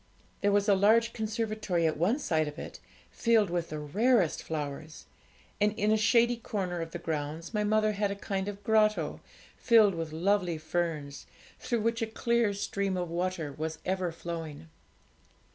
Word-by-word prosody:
There 205 - +3
was 205 +1 +2
a 205 - +6
large 220 +4 +4
conservatory 215 -5 -1
at 160 - +1
one 185 - +1
side 160 - 0
of 150 +1 -7
it, - - -8 0.3
filled 225 -5 +2
with 175 -1 -2
the 155 - -4
rarest 195 - +2
flowers, 155 0 -6 0.6
and 210 0 +3
in 210 0 +1
a - - +5
shady 235 +2 +3
corner 185 -6 -3
of 165 - -4
the 175 - -6
grounds 160 +2 -4
my 210 -1 +1
mother 215 0 +2
had 205 0 -1
a 200 - -3
kind 195 -1 -3
of 205 0 -6
grotto, 215 0 +2 0.4
filled 220 -4 +5
with 165 -2 -4
lovely 180 +1 +1
ferns, 155 -3 -3 0.3
through 235 -3 -1
which 230 +1 0
a 225 - 0
clear 235 0 +1
stream 200 -1 -2
of 175 -2 -3
water 170 -4 -2
was 160 +1 -4
ever 185 -2 -1
flowing. 165 -2 -7
195 Hz, 170 wpm, -29 LUFS, 165-215 Hz, 0.6 s, a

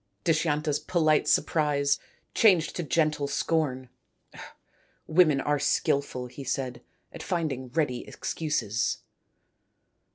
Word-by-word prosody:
Dushyanta's 155 -2 +1
polite 155 -4 +2
surprise 145 -2 +2 0.3
changed 185 -8 +4
to - - -2
gentle 150 -2 0
scorn. 135 -5 -1 0.6
" - - -28 0.4
Women 155 -4 +4
are 145 +1 0
skilful," 140 -2 0
he 125 +3 -9
said, 130 -2 -3 0.2
" - - -36
at - - -8
finding 155 -8 -2
ready 140 -3 -1
excuses." 150 -8 -2
150 Hz, 105 wpm, -27 LUFS, 135-160 Hz, 0.6 s, changed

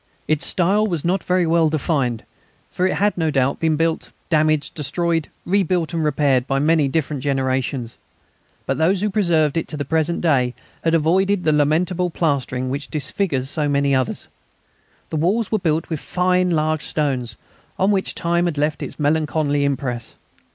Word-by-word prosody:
Its 155 -1 +1
style 200 +4 +2
was 170 -6 -2
not 180 +1 +1
very 180 -1 +2
well 165 -1 +3
defined, 140 -6 -1 0.5
for 185 - +1
it - - -1
had 205 +1 +1
no 160 -3 0
doubt 135 -2 +1
been 160 -1 +2
built, 165 +1 -1 0.2
damaged, 155 -1 +2
destroyed, 165 +2 -1 0.2
rebuilt 180 -3 +1
and 165 -1 0
repaired 140 -4 +2
by 135 - 0
many 150 +1 +3
different 145 -1 -2
generations. 130 -3 -1 0.7
But - - -1
those 180 +4 +2
who 210 0 0
preserved 170 -7 +2
it 165 - -1
to 155 - -5
the 145 - -3
present 160 +3 0
day 130 -7 +2 0.3
had 165 0 +2
avoided 185 +4 +2
the 155 - +3
lamentable 165 +5 +1
plastering 130 -6 -1
which 140 +1 -4
disfigures 145 -3 -1
so 150 -2 0
many 140 0 +2
others. 130 -1 -1 0.8
The 160 - -1
walls 195 +8 +1
were 215 - +2
built 160 -3 0
with 160 - -1
fine 180 +2 +1
large 155 -2 +1
stones, 130 -7 -2 0.4
on 190 +2 +2
which 195 -2 -1
time 170 0 +1
had 170 -4 -2
left 150 +1 0
its - - -6
melancholy 150 -1 +1
impress. 130 -4 -2
155 Hz, 170 wpm, -21 LUFS, 140-175 Hz, 0.8 s, well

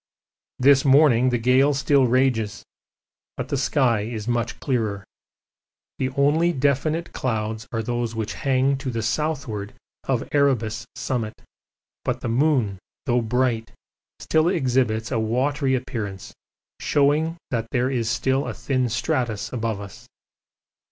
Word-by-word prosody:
This 135 +1 +5
morning 135 -3 +5
the 125 - +1
gale 130 +4 +3
still 140 -1 +3
rages, 120 -4 +1 0.7
but - - -4
the - - 0
sky 130 -4 +2
is 110 0 -5
much 120 -1 -1
clearer; 110 -7 -1 0.9
the 130 - 0
only 155 +5 +3
definite 150 +3 0
clouds 110 -2 -2
are 115 -1 -2
those 120 0 -2
which 110 -1 -3
hang 135 -1 +1
to 135 0 -4
the 115 -2 -2
southward 115 -5 -2 0.3
of - - -1
Erebus 120 -6 +1
summit, 125 -4 -3 0.7
but - - -2
the 120 - -3
moon, 120 -6 +1 0.3
though 120 -1 +2
bright, 120 -1 0 0.4
still 160 +1 +1
exhibits 125 - +1
a - - +1
watery 130 +5 +1
appearance, 105 -6 -5 0.5
showing 150 +4 +2
that 115 -2 -1
there 125 +1 0
is 115 -4 -1
still 130 +3 0
a - - -4
thin 130 -3 -1
stratus 120 -2 -1
above 115 -4 -2
us. 100 -1 -11
125 Hz, 130 wpm, -23 LUFS, 115-140 Hz, 0.9 s, This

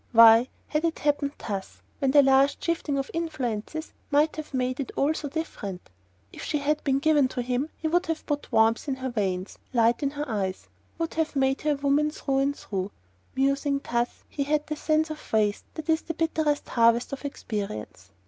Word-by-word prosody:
Why 230 +1 +8 0.2
had 300 +1 0
it 330 -1 0
happened 290 -1 0
thus, 195 -3 -6 0.2
when 270 - +2
the 285 +1 +7
least 270 +1 +4
shifting 325 -4 0
of 275 0 -3
influences 310 -3 -3 0.2
might 295 +2 +3
have 310 - -6
made 255 -1 -1
it 275 - -3
all 290 +3 +2
so 300 -2 -4
different? 205 - -5 0.4
If - - -9
she 300 - -1
had 295 +1 0
been 270 -2 +2
given 295 -1 +4
to 250 -1 -3
him 250 +1 0
then - - -15
he 320 - -2
would 350 +3 +1
have 325 -1 -3
put 290 -1 -3
warmth 225 +5 +3
in 275 - 0
her 260 -1 -4
veins 190 -4 -2
and - - -16
light 230 +1 +4
in 280 - +1
her 295 +1 -4
eyes: 195 -5 -3 0.3
would 330 -1 -2
have 320 -2 -1
made 270 0 +2
her 300 -1 +2
a - - -1
woman 285 +2 +2
through 275 -3 -1
and 280 +1 +1
through. 195 -1 -3 0.5
Musing 275 +1 +1
thus, 240 0 -1
he 280 - -2
had 300 +1 0
the 305 - -3
sense 310 +1 +1
of 310 - -6
waste 210 -2 +1
that 315 - -6
is 320 0 +3
the 330 - -5
bitterest 315 -3 0
harvest 235 +2 +3
of 275 - -6
experience. 200 - -5
275 Hz, 205 wpm, -26 LUFS, 235-305 Hz, 0.5 s, Why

